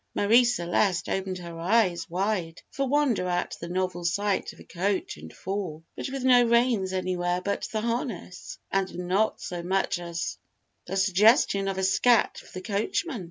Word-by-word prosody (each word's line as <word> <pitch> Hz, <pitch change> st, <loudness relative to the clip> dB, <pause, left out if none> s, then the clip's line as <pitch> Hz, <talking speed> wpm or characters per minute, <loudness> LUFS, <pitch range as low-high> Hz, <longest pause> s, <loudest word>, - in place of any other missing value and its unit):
Marie 230 Hz, +5 st, +5 dB
Celeste 180 Hz, -4 st, +1 dB
opened 190 Hz, -1 st, -2 dB
her 170 Hz, -2 st, -8 dB
eyes 180 Hz, -2 st, +1 dB
wide 180 Hz, -2 st, -2 dB
for 275 Hz, 0 st, -1 dB
wonder 275 Hz, -10 st, +2 dB
at 175 Hz, 0 st, -1 dB
the 170 Hz, -, -6 dB
novel 180 Hz, -1 st, -2 dB
sight 200 Hz, +3 st, 0 dB
of -, -, -18 dB
a -, -, -11 dB
coach 190 Hz, +2 st, -2 dB
and 80 Hz, +1 st, -11 dB
four, 185 Hz, -5 st, -5 dB
but -, -, -4 dB
with 270 Hz, -1 st, -4 dB
no 250 Hz, -1 st, +6 dB
reins 235 Hz, -5 st, +2 dB
anywhere 180 Hz, -1 st, -1 dB
about 200 Hz, +2 st, -2 dB
the 215 Hz, -, -1 dB
harness, 230 Hz, -6 st, -4 dB
and 195 Hz, -1 st, -1 dB
not 185 Hz, +5 st, 0 dB
so 175 Hz, -1 st, -5 dB
much 185 Hz, 0 st, 0 dB
as 170 Hz, -, -4 dB, 0.5 s
the 190 Hz, +2 st, -3 dB
suggestion 195 Hz, +1 st, +4 dB
of 195 Hz, -1 st, -2 dB
a 190 Hz, -, -1 dB
scat 230 Hz, +5 st, +3 dB
for -, -, -16 dB
the 185 Hz, -, -7 dB
coachman. 235 Hz, -, -2 dB
190 Hz, 170 wpm, -27 LUFS, 175-220 Hz, 0.5 s, no